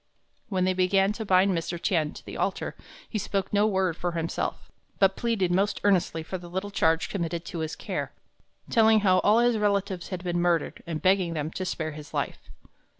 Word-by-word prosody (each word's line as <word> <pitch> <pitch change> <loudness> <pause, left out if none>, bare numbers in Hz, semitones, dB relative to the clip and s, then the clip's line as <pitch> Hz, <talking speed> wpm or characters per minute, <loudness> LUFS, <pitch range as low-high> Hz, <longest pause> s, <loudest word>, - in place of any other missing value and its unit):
When 185 -3 0
they 185 - +2
began 195 +2 +3
to 220 0 -5
bind 190 0 +4
Mr. 170 +1 -3
Tien 160 -4 +1
to - - -12
the - - -8
altar, - - -2 0.3
he 215 - -3
spoke 195 0 -2
no 205 +1 +4
word 190 -4 +1
for 175 0 -3
himself, 165 -1 -3 0.3
but 195 -1 +4
pleaded 220 -7 0
most 195 +4 +1
earnestly 180 -5 +2
for 185 +3 -5
the 175 0 -11
little 190 +3 -4
charge 160 -3 +2
committed 170 -3 -3
to 170 - -5
his 160 -1 -3
care, - - -4 0.6
telling 220 -1 +5
how 185 -2 +4
all 210 +4 +4
his 240 -1 +3
relatives 200 -3 0
had 185 -2 -5
been 175 -1 -1
murdered, 175 -3 0
and 160 -2 -4
begging 185 -3 +3
them 155 +1 -2
to 185 - -4
spare 160 -3 -3
his 150 0 -10
life. - - -3
185 Hz, 200 wpm, -27 LUFS, 170-200 Hz, 0.6 s, telling